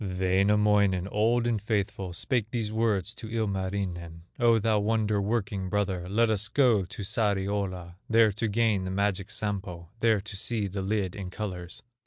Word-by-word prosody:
Wainamoinen, 95 0 +2
old 115 +3 +2
and 115 -3 0
faithful, 100 -3 -2
Spake 110 +4 -1
these 115 -3 -2
words 110 -2 0
to 115 -2 -9
Ilmarinen: 95 -6 -3 0.2
"O 115 -1 +5
thou 110 -1 +2
wonder 105 -1 +1
working 100 -3 -1
brother, 95 -3 -1
Let 110 +3 +3
us 105 0 0
go 120 -9 +3
to 95 +3 -8
Sariola, 95 -4 -1
There 115 -1 +5
to 110 +3 -2
gain 105 -3 +1
the - - -3
magic 95 0 -1
Sampo, 95 -5 -4
There 115 -2 +3
to 100 +1 -8
see 110 +1 -1
the 100 0 -4
lid 95 -2 -1
in 95 -3 -5
colors." 90 -3 -6
100 Hz, 160 wpm, -28 LUFS, 95-110 Hz, 0.2 s, O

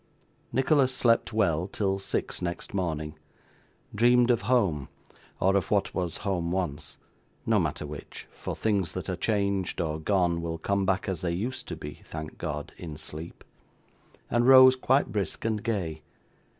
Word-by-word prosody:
Nicholas 135 0 +3
slept 120 -3 +2
well 90 -6 +1
till 95 -1 -1
six 95 - -3
next 85 -1 -4
morning; 80 -5 -3 0.7
dreamed 120 +3 +5
of 120 - +2
home, 85 - +2 0.5
or 95 +1 +3
of 100 - +1
what 100 -2 +1
was 90 -3 -2
home 85 -4 0
once 85 -6 -3 0.5
no - - +3
matter - - -2
which, 75 0 -9
for - - -6
things 100 -6 0
that - - -5
are - - -1
changed 100 -4 0
or 80 -2 -1
gone 85 -1 +1
will 85 0 -3
come 100 +3 0
back 95 +3 +1
as 95 -4 -2
they 90 - -1
used 115 +10 -3
to - - -4
be, - - -9
thank 80 -1 -8
God! 75 -1 -4
in 80 -4 -7
sleep 80 +1 -8 0.8
and 120 +1 +2
rose 130 -1 +9
quite 130 +2 +2
brisk 100 +1 -2
and 110 -2 0
gay. 85 -9 -2
95 Hz, 160 wpm, -28 LUFS, 80-110 Hz, 0.8 s, rose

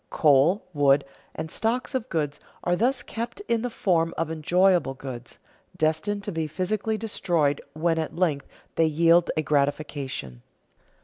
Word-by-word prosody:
Coal, 150 +6 +4
wood, 140 -1 +4 0.3
and 160 - -5
stocks 240 +5 -1
of 260 -1 -2
goods, 150 -3 -2 0.2
are 175 - +2
thus 245 +5 +1
kept 235 - -5
in 235 - 0
the 245 - -2
form 170 -7 +1
of 165 0 -1
enjoyable 175 -1 +2
goods, 125 -3 -8 0.4
destined 160 +7 0
to 205 - -4
be 160 -3 -2
physically 200 +7 -1
destroyed 170 -9 0
when 165 +1 +1
at 160 - -3
length 160 -6 0 0.3
they 165 - +4
yield 165 +2 +4
a 155 - +1
gratification. 140 - -2
165 Hz, 145 wpm, -25 LUFS, 145-205 Hz, 0.4 s, Coal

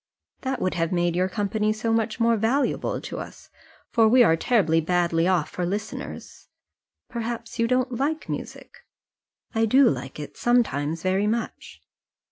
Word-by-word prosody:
"That 265 -1 -2
would 185 - 0
have 165 -1 -1
made 175 -1 +1
your 185 +1 +1
company 210 +2 0
so 220 +1 -1
much 225 0 0
more 230 0 +3
valuable 230 +6 0
to - - -6
us, - - -10 0.4
for 225 -2 +4
we 245 +2 +6
are 165 -7 +4
terribly 165 -4 +2
badly 170 0 +1
off 180 -5 +1
for 180 - -3
listeners. 205 +5 -5 0.6
Perhaps 235 0 -5
you 230 - +3
don't 255 +1 +1
like 305 +3 -1
music?" - - -7 0.7
"I 225 0 +2
do 265 +4 +5
like 135 +1 -3
it, 150 - -8
sometimes 165 - +1
very 190 +2 +1
much." 225 +1 -4
215 Hz, 155 wpm, -25 LUFS, 175-235 Hz, 0.7 s, we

